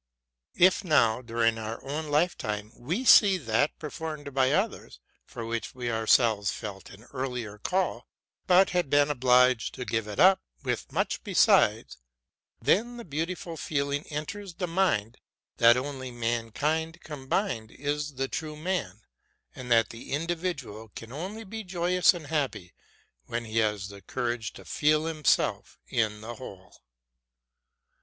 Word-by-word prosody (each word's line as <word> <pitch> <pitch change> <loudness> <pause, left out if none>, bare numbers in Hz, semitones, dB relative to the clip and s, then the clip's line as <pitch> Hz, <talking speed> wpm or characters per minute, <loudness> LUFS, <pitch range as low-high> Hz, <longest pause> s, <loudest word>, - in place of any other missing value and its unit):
If, 185 +3 +4
now, 125 - +3
during 115 -1 0
our 110 +1 -5
own 150 +3 -3
lifetime, 110 -9 -1
we 170 - -3
see 200 -5 +7
that 125 -1 0
performed 150 -2 -6
by 130 0 +3
others, 195 +7 -1 0.3
for 115 - -7
which 115 +1 -4
we 120 -2 -3
ourselves 110 -2 +3
felt 95 -3 -7
an 100 +2 -14
earlier 125 -6 -4
call, 185 - -1 0.4
but 185 +1 +5
had 180 -5 0
been 145 +1 +4
obliged 125 -2 +3
to 125 - -5
give 110 -2 -1
it 105 - -6
up, 190 +1 +6 0.2
with - - -3
much - - -1
besides, - - +3 0.6
then 240 +4 +1
the 235 - -8
beau 160 0 -2
tiful 175 -1 -6
feeling 140 -1 -2
enters 170 +5 -6
the 180 - -2
mind 165 - 0 0.4
that 120 +1 +6
only 130 -1 -4
mankind 120 +8 -2
combined 135 - -2
is 145 +2 -3
the 135 +1 -1
true 155 +1 -5
man, 150 - -3 0.5
and 125 -1 -8
that 115 -1 +4
the 115 +3 -8
individual 150 - -3
can 115 0 -9
only 190 - -6
be 220 +2 -7
joyous 180 -1 +3
and 165 -3 -8
happy 140 - -2 0.5
when 120 0 -3
he 110 0 -1
has 105 -3 0
the 100 0 -11
courage 120 -2 -3
to - - -13
feel 155 +1 +2
himself 155 -3 0
in 105 -2 -1
the 115 +2 -6
whole. 100 -7 -12
135 Hz, 145 wpm, -28 LUFS, 115-165 Hz, 0.6 s, see